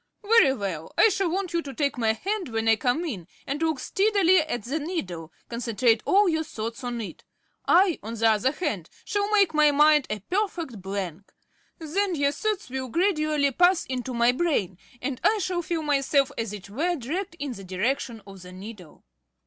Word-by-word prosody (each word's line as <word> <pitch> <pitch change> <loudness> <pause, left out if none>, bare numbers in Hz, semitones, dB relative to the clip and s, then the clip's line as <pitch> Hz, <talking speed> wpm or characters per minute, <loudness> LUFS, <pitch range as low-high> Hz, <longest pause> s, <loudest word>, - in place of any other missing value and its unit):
"Very 425 -9 +5
well. 185 - -5
I 445 - +7
shall 385 -2 0
want 370 +1 -2
you 340 - +1
to 275 -4 -8
take 285 -3 0
my 225 -3 +1
hand 385 - -3
when 225 -1 -2
I 225 - +6
come 250 +9 0
in, 195 - -5 0.2
and 285 +3 -3
look 320 -4 0
steadily 390 +1 +3
at 305 -8 -2
the 275 +8 -2
needle 185 - -5 0.2
concentrate 235 -1 +1
all 405 +1 +5
your 320 -2 +1
thoughts 230 -1 -6
on 245 -1 -3
it. 215 - -8 0.4
I, 360 -1 +4
on 225 +2 -6
the 225 0 +2
other 225 +4 +3
hand, 280 - -3 0.2
shall 410 0 -1
make 400 -5 +4
my 305 -1 +5
mind 300 0 +4
a 215 -1 -3
perfect 345 - -3
blank. 195 -1 -5 0.5
Then 360 +4 -1
your 285 -1 +2
thoughts 425 +7 -2
will 260 0 -3
gradually 305 - +1
pass 355 +5 +3
into 255 -1 -4
my 235 +1 +4
brain, 250 - -1 0.2
and 255 -1 -3
I 440 - +4
shall 365 -3 -1
feel 335 -1 -3
myself 280 -1 +2
as 225 -3 -3
it 205 -2 -8
were, 335 - 0
dragged 335 +7 -4
in 285 -3 -4
the 195 - -10
direction 220 +4 -2
of 195 -2 -12
the 180 0 -11
needle." 185 -3 -11
280 Hz, 190 wpm, -26 LUFS, 225-345 Hz, 0.5 s, I